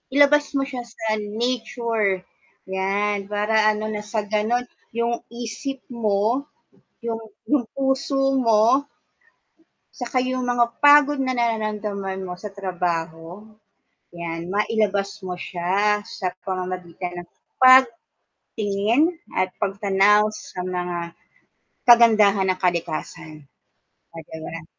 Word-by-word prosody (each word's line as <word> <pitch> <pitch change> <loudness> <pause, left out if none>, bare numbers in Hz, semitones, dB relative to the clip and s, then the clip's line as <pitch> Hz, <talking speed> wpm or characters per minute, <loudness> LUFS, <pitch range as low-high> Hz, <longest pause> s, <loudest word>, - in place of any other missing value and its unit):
Ilabas 290 +1 +4
mo 275 - +2
siya 255 -3 -5
sa 225 -2 -3
nature, 225 -2 -1 0.5
'yan, 200 +1 -1
para 215 +1 +2
ano, 215 0 -3
nang 210 0 -5
sa 215 0 -2
ganun 220 +4 0 0.3
yung 235 0 0
isip 240 +3 -6
mo, 230 +4 0 0.6
yung 225 -1 -2 0.3
yung 285 -5 +2
puso 270 0 +1
mo 230 +4 +4 1.1
saka 250 0 -2
yung 255 -1 -1
mga 240 -1 +4 0.2
pagod 290 0 +6
na 260 - -1
nararamdaman 210 -4 -2
mo 180 - -5
sa 210 +1 -7
trabaho, 175 0 -3 0.7
'yan, 165 -1 -5
mailabas 205 -2 +1 0.2
mo 180 -1 -4
siya, 200 +4 +1
sa 185 - -4 0.2
pamamagitan 180 -1 -4
ng 175 - -16 1.1
pagtingin 210 +6 0 0.4
at 185 0 +1
pagtanaw 205 +1 +3
sa 185 - -9
mga 180 -1 -3 0.9
kagandahan 215 -5 +6
ng 185 - 0
kalikasan. 155 -3 -3 0.7
At, 160 -2 -9
ayan. 160 +1 -7
210 Hz, 105 wpm, -23 LUFS, 190-235 Hz, 1.1 s, pagod